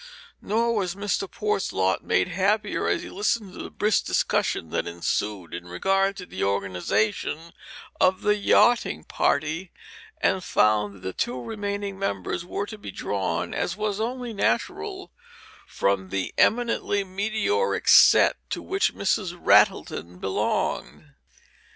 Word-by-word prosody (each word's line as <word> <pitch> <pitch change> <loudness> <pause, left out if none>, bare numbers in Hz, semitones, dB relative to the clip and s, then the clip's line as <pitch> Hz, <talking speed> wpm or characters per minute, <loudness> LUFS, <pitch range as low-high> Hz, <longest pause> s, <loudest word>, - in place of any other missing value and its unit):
Nor 230 +2 +1
was 190 -3 -1
Mr. 200 -1 -2
Port's 210 -4 -1
lot 95 -1 0
made 90 - +1
happier 205 +3 0
as - - 0
he - - -8
listened 205 -1 -1
to - - -8
the - - -7
brisk 210 0 +1
discussion 80 - 0
that - - -1
ensued 85 +1 -3
in 85 +1 -6
regard 195 - +1
to 180 - -7
the - - -5
organization 100 - -1 0.5
of 185 0 +3
the 210 0 +3
yachting 205 - +3
party, 160 +4 -1 0.5
and 190 -1 +1
found 105 - +1
that - - -4
its - - -1
two 125 +1 -5
remaining 200 - -4
members 100 - -2
were 195 +3 -3
to 215 0 -9
be - - -8
drawn, 95 -4 -2
as 180 - -2
was 210 -1 -2
only 245 0 -3
natural, 115 - -2 0.6
from 95 -1 0
the 95 -1 -3
eminently 230 -3 +2
meteoric 220 - -1
set - - +7
to - - -4
which 390 0 0
Mrs. 190 -2 -1
Rattleton 85 - +3
belonged. 95 +1 -2
190 Hz, 140 wpm, -25 LUFS, -, 0.6 s, set